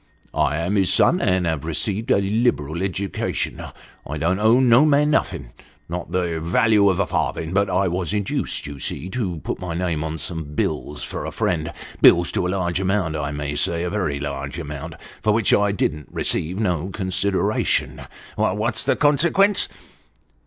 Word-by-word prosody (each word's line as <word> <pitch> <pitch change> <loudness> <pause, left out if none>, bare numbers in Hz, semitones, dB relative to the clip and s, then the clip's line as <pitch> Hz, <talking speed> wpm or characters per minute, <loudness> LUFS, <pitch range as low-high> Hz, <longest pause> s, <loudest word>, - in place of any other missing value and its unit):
" - - -33 0.2
I 75 - -2
am 90 +5 0
his 95 -2 +2
son, 180 +2 +4
and 95 -2 +1
have 80 -3 -1
received 100 - -1
a 100 - +4
liberal 100 - 0
education. 95 0 -2 0.4
I 75 - -5
don't 85 +5 0
owe 110 +4 +5
no 125 +1 +6
man 150 0 +3
nothing - - -1 0.4
not 85 +1 -5
the 85 -3 -1
value 100 +5 +3
of 95 -1 0
a 100 - +2
farthing, 80 0 -2
but 100 +1 +2
I 100 - +1
was 90 0 -2
induced, 105 -2 -1
you 70 -1 -8
see, 90 - -3
to 95 -8 -2
put - - -4
my 85 -2 -4
name 85 -3 -1
to 80 0 -3
some 80 -1 -5
bills 75 +1 -2
for - - -4
a - - -3
friend 80 -3 -1 0.3
bills 85 0 +6
to 90 - -1
a - - -2
largo 90 -1 -1
amount, 95 -4 0
I 75 -2 -2
may 75 0 -4
say 85 +3 0
a 90 - -2
very 80 -9 -1
large 70 0 -5
amount, 80 0 -6 0.3
for 105 - +2
which 115 -2 +2
I 105 0 +3
didn't 75 -6 -2
receive 90 +6 0
no 90 -4 -1
consideration. 95 0 0 0.4
What's - - +1
the - - +2
consequence 170 +8 +3
90 Hz, 180 wpm, -22 LUFS, 80-100 Hz, 0.4 s, no